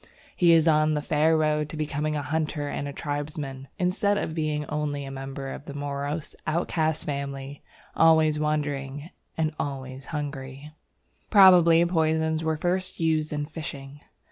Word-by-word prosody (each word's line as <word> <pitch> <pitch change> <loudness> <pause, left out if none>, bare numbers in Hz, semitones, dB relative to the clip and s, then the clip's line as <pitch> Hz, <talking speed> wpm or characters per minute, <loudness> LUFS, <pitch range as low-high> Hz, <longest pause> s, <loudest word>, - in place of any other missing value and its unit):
He 175 -2 +5
is 165 0 +4
on 155 -1 +4
the 150 - 0
fair 155 +2 +3
road 150 -1 +1
to 155 - -7
becoming 150 0 -2
a 145 - -2
hunter 150 +1 -2
and 140 0 -4
tribesman, 145 -2 -4
instead 195 +2 +1
of 160 - -2
being 155 -2 -1
only 145 -1 -3
a 135 - -7
member 135 0 -6
of 145 - -10
a 140 - -7
morose, 145 +2 -4
outcast 160 -1 0
family, 140 -1 -5 0.3
always 160 -2 +4
wandering 145 0 -2 0.3
and 155 -1 0
always 135 -1 -5
hungry. 145 -1 -6 0.6
Probably 175 -4 +7
poisons 160 -1 +1
were 160 -1 0
first 185 +3 -2
used 160 -2 +1
in 150 -1 -2
fishing. 145 -3 -8
150 Hz, 145 wpm, -26 LUFS, 145-160 Hz, 0.6 s, Probably